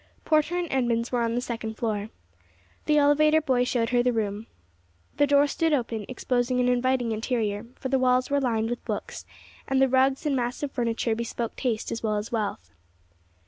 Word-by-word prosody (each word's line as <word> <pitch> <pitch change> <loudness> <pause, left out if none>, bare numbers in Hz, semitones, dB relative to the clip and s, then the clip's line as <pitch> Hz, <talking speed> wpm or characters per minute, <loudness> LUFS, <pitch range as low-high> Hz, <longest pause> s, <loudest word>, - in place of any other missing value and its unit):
Porter 335 +3 +2
& - - -8
Edmunds 240 -3 0
were 245 -1 +1
on 230 0 0
the 245 - 0
second 225 -2 -5
floor. 215 -2 -2 0.8
The 300 -1 +3
elevator 300 +2 +4
boy 260 -5 +1
showed 240 -2 0
her 245 -1 +3
the 250 0 +2
room. 215 -1 -2 0.7
The 290 - +4
door 285 0 +5
stood 320 +2 0
open, 230 -6 -2
exposing 250 0 0
an 250 - +2
inviting 250 -1 +1
interior, 220 -1 -2
for 260 - -5
the 265 0 +2
walls 255 +1 +2
were 285 0 +2
lined 225 -3 0
with 240 - -4
books, - - -5 0.4
and 270 0 +1
the 270 - +5
rugs 265 +3 +2
and 290 -2 +1
massive 250 +3 -2
furniture 230 -2 -1
bespoke 230 0 -4
taste 235 -5 -2
as 230 - -3
well 215 -2 0
as 210 +2 -5
wealth. 205 - -3
245 Hz, 185 wpm, -26 LUFS, 230-270 Hz, 0.8 s, door